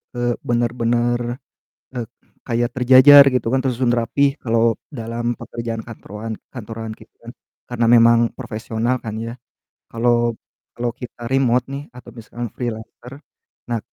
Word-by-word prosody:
eee, 120 Hz, 0 st, 0 dB
bener-bener, 120 Hz, +1 st, 0 dB, 0.6 s
eee, 120 Hz, -2 st, -4 dB, 0.4 s
kayak 120 Hz, -1 st, 0 dB
terjajar 130 Hz, +3 st, +8 dB
gitu 125 Hz, -, 0 dB
kan, 135 Hz, -, +2 dB
tersusun 125 Hz, -2 st, 0 dB
rapih 135 Hz, +4 st, +1 dB
kalo 115 Hz, -1 st, +2 dB, 0.2 s
dalam 120 Hz, -2 st, -4 dB
pekerjaan 115 Hz, -1 st, -5 dB
kantorwan 110 Hz, -1 st, -7 dB, 0.2 s
kantoran 110 Hz, -2 st, -7 dB
gitu -, -, -18 dB
kan, -, -, -9 dB, 0.4 s
karena 120 Hz, -1 st, 0 dB
memang 115 Hz, 0 st, +6 dB, 0.2 s
profesional 115 Hz, +1 st, -2 dB
kan 110 Hz, -2 st, -4 dB
ya. 115 Hz, +1 st, -5 dB, 0.6 s
Kalo 120 Hz, 0 st, +1 dB, 0.4 s
kalo 120 Hz, 0 st, -2 dB
kita 120 Hz, -2 st, -9 dB
remote 125 Hz, -2 st, +2 dB
nih 140 Hz, -, -5 dB
atau 125 Hz, -, -12 dB
misalkan 120 Hz, +1 st, -7 dB
freelancer, 120 Hz, +1 st, -6 dB, 0.6 s
nah 120 Hz, -, 0 dB
120 Hz, 130 wpm, -20 LUFS, 115-125 Hz, 0.6 s, terjajar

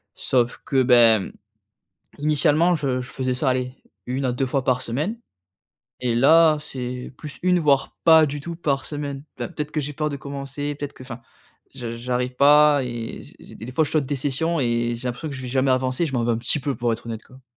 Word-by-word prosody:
sauf 125 Hz, -1 st, 0 dB
que, 135 Hz, -1 st, +2 dB
ben, 115 Hz, -5 st, +5 dB, 0.9 s
mmh, -, -, -14 dB
initialement, 155 Hz, +3 st, +3 dB
je 135 Hz, -5 st, -1 dB
je 125 Hz, -, -8 dB
faisais 130 Hz, -1 st, -2 dB
ça 130 Hz, +2 st, 0 dB
aller 125 Hz, 0 st, -2 dB, 0.3 s
1 130 Hz, +2 st, -2 dB
à 125 Hz, -, +1 dB
2 130 Hz, +2 st, -1 dB
fois 130 Hz, 0 st, -1 dB
par 130 Hz, -1 st, +1 dB
semaine, 150 Hz, -, -3 dB, 0.8 s
et 125 Hz, -2 st, 0 dB
là, 155 Hz, +5 st, +5 dB
c'est 125 Hz, -3 st, -6 dB
plus 150 Hz, 0 st, -8 dB
1 180 Hz, -1 st, +3 dB
voire 140 Hz, -3 st, +1 dB
pas 160 Hz, -1 st, +7 dB
du 145 Hz, 0 st, -5 dB
tout 170 Hz, +3 st, -6 dB
par 140 Hz, -5 st, -1 dB
semaine. 145 Hz, -2 st, -5 dB, 0.2 s
Enfin -, -, -3 dB
peut-être 150 Hz, -3 st, -5 dB
que 150 Hz, -, -1 dB
j'ai 145 Hz, +1 st, -5 dB
peur 150 Hz, +1 st, -2 dB
de 140 Hz, -, -4 dB
commencer, 140 Hz, +1 st, -5 dB
peut-être 145 Hz, 0 st, -6 dB
que, -, -, -12 dB
enfin, 125 Hz, -1 st, -8 dB, 0.5 s
j 115 Hz, -1 st, -6 dB
j'arrive 125 Hz, +1 st, -2 dB
pas 145 Hz, +1 st, +6 dB
et 120 Hz, -2 st, -6 dB
j -, -, -16 dB
j -, -, -13 dB
des 110 Hz, -, -9 dB
des 125 Hz, -, -7 dB
fois 160 Hz, +5 st, +2 dB
je -, -, -5 dB
saute 150 Hz, -4 st, +1 dB
des 145 Hz, +1 st, -2 dB
sessions, 145 Hz, +5 st, -1 dB
et 120 Hz, -1 st, 0 dB
j'ai 125 Hz, +2 st, -4 dB
l'impression 125 Hz, +6 st, -5 dB
que 140 Hz, -, -6 dB
je 130 Hz, -, -7 dB
vais 125 Hz, -, -5 dB
jamais 130 Hz, +1 st, +1 dB
avancer 130 Hz, +3 st, 0 dB
et -, -, 0 dB
je 145 Hz, -, -6 dB
m'en 120 Hz, -3 st, 0 dB
veux 120 Hz, -, +1 dB
un 115 Hz, -, -1 dB
petit 120 Hz, +5 st, +1 dB
peu 140 Hz, +1 st, -2 dB
pour 120 Hz, -1 st, 0 dB
être 115 Hz, -, -6 dB
honnête 115 Hz, -1 st, -5 dB
quoi. 130 Hz, 0 st, -18 dB
135 Hz, 235 wpm, -23 LUFS, 125-150 Hz, 0.9 s, pas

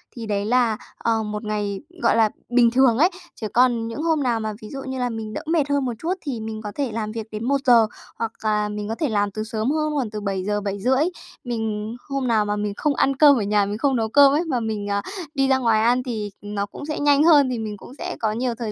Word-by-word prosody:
thì 230 Hz, -, -6 dB
đấy 205 Hz, -1 st, -1 dB
là, 235 Hz, -2 st, +2 dB, 0.2 s
ờ, 225 Hz, -1 st, 0 dB
một 210 Hz, +1 st, -4 dB
ngày, 205 Hz, -2 st, -2 dB, 0.2 s
gọi -, -, +3 dB
là, 220 Hz, -2 st, +4 dB, 0.2 s
bình 240 Hz, -1 st, +4 dB
thường 250 Hz, -2 st, +4 dB
ấy. 335 Hz, +7 st, +5 dB, 0.3 s
Chứ 220 Hz, -, -4 dB
còn 240 Hz, -2 st, +3 dB
những 230 Hz, +7 st, -5 dB
hôm 320 Hz, -4 st, +1 dB
nào 235 Hz, -3 st, +1 dB
mà 215 Hz, -1 st, -3 dB
ví 215 Hz, -, -9 dB
dụ 275 Hz, -1 st, -6 dB
như 265 Hz, -1 st, -4 dB
là 245 Hz, -1 st, 0 dB
mình 220 Hz, -1 st, -5 dB
đỡ -, -, -4 dB
mệt 310 Hz, -3 st, +1 dB
hơn 285 Hz, -2 st, +1 dB
một 245 Hz, -, -1 dB
chút 340 Hz, +3 st, -1 dB
thì 265 Hz, -6 st, -4 dB
mình 220 Hz, 0 st, -5 dB
có 210 Hz, -2 st, -5 dB
thể 275 Hz, -5 st, -1 dB
làm 215 Hz, -1 st, -3 dB
việc 225 Hz, 0 st, -5 dB
đến 215 Hz, +1 st, -5 dB
1:00, 255 Hz, -5 st, +4 dB, 0.3 s
hoặc 225 Hz, -1 st, -1 dB
là 210 Hz, -1 st, +1 dB
mình 210 Hz, 0 st, -4 dB
có 225 Hz, -, -2 dB
thể 305 Hz, 0 st, -1 dB
làm 205 Hz, -2 st, +1 dB
từ 215 Hz, +2 st, -4 dB
sớm 220 Hz, +3 st, -2 dB
hơn, 305 Hz, 0 st, 0 dB
khoảng 255 Hz, -6 st, -1 dB
từ 210 Hz, 0 st, -6 dB
7:00-7:30. 205 Hz, +6 st, 0 dB, 0.4 s
Mình 220 Hz, -2 st, -3 dB
hôm 275 Hz, -2 st, -1 dB
nào 220 Hz, -3 st, +2 dB
mà 205 Hz, -, -1 dB
mình 210 Hz, -1 st, -2 dB
không 290 Hz, -2 st, +1 dB
ăn 275 Hz, -, +2 dB
cơm 285 Hz, 0 st, +7 dB
ở 225 Hz, -, 0 dB
nhà, 205 Hz, 0 st, +2 dB
mình 205 Hz, +1 st, -3 dB
không 270 Hz, +2 st, +1 dB
nấu 225 Hz, -2 st, 0 dB
cơm 280 Hz, +3 st, +7 dB
ấy, 310 Hz, +4 st, +2 dB
mà 255 Hz, -5 st, 0 dB
mình, 215 Hz, -3 st, -3 dB
à, 200 Hz, 0 st, 0 dB, 0.3 s
đi 270 Hz, 0 st, +2 dB
ra 265 Hz, -1 st, +4 dB
ngoài 230 Hz, -4 st, +2 dB
ăn 245 Hz, +2 st, +3 dB
thì 215 Hz, -5 st, -4 dB
nó 205 Hz, -1 st, -3 dB
cũng 245 Hz, +8 st, -9 dB
sẽ 305 Hz, -, -3 dB
nhanh 290 Hz, 0 st, +4 dB
hơn, 295 Hz, -5 st, +6 dB
thì 245 Hz, -2 st, -2 dB
mình 215 Hz, -2 st, -5 dB
cũng 220 Hz, -, -13 dB
sẽ 360 Hz, +1 st, -4 dB
có 220 Hz, -2 st, 0 dB
nhiều 240 Hz, +2 st, -1 dB
thời 230 Hz, -2 st, -4 dB
230 Hz, 265 wpm, -23 LUFS, 210-265 Hz, 0.4 s, cơm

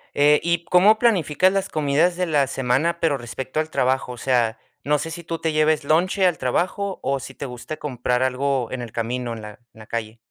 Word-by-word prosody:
Eh, 150 Hz, +1 st, +5 dB
y 170 Hz, 0 st, 0 dB
¿cómo 200 Hz, +5 st, +5 dB
planificas 185 Hz, -, +2 dB
las 195 Hz, -1 st, -1 dB
comidas 155 Hz, +4 st, +1 dB
de 180 Hz, -, 0 dB
la 145 Hz, -5 st, +2 dB
semana, 135 Hz, +7 st, 0 dB
pero 160 Hz, -4 st, +1 dB
respecto 130 Hz, +4 st, -5 dB
al 155 Hz, 0 st, -1 dB
trabajo? 130 Hz, -2 st, 0 dB
O -, -, -11 dB
sea, 120 Hz, -2 st, +1 dB, 0.3 s
¿no 150 Hz, +1 st, +2 dB
sé 160 Hz, +3 st, -5 dB
si 170 Hz, +1 st, -7 dB
tú 165 Hz, 0 st, -4 dB
te 160 Hz, -, -1 dB
lleves 155 Hz, 0 st, +2 dB
lonche 180 Hz, +6 st, +2 dB
al 180 Hz, -3 st, +2 dB
trabajo 185 Hz, +9 st, -1 dB
o 135 Hz, 0 st, 0 dB
si 135 Hz, +1 st, -10 dB
te -, -, -6 dB
gusta 125 Hz, +4 st, -7 dB
comprar 125 Hz, -2 st, -1 dB
algo 130 Hz, -1 st, 0 dB
en 130 Hz, -, -4 dB
el 120 Hz, -2 st, -7 dB
camino, 120 Hz, +1 st, -3 dB
en 115 Hz, -, -8 dB
la 105 Hz, -, -7 dB
en -, -, -18 dB, 0.2 s
la 110 Hz, -, -11 dB
calle? 110 Hz, 0 st, -5 dB
145 Hz, 220 wpm, -22 LUFS, 125-170 Hz, 0.3 s, Eh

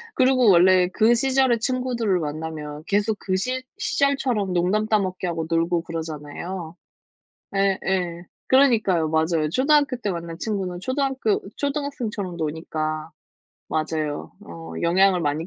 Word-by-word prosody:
그러고 255 Hz, -3 st, +4 dB
원래 180 Hz, 0 st, +6 dB
그 225 Hz, +2 st, +4 dB
시절의 260 Hz, -2 st, +2 dB
친구들을 240 Hz, -6 st, 0 dB
만나면 155 Hz, -1 st, -5 dB
계속 205 Hz, +1 st, +1 dB
그 185 Hz, -, -1 dB
시 255 Hz, +7 st, -2 dB
시절처럼 270 Hz, -, 0 dB
농담 190 Hz, +5 st, +1 dB
따먹기 190 Hz, -4 st, 0 dB
하고 165 Hz, -2 st, -2 dB
놀고 165 Hz, +1 st, +1 dB
그러잖아요. 165 Hz, +2 st, -6 dB, 0.8 s
예예. 190 Hz, -3 st, 0 dB, 0.2 s
그러니까요. 220 Hz, -, +3 dB
맞아요. 160 Hz, -1 st, +1 dB
초등학교 285 Hz, -, +3 dB
때 210 Hz, -4 st, -2 dB
만난 170 Hz, -1 st, -6 dB
친구는 190 Hz, -4 st, -3 dB
초등학교 260 Hz, -2 st, 0 dB, 0.2 s
초등학생처럼 255 Hz, -, -3 dB
노니까. 155 Hz, 0 st, -3 dB, 0.6 s
맞아요. 155 Hz, -, -2 dB
어 85 Hz, -1 st, -9 dB
영향을 185 Hz, +1 st, +3 dB
많이 150 Hz, +2 st, -1 dB
185 Hz, 310 characters per minute, -23 LUFS, 160-235 Hz, 0.8 s, 원래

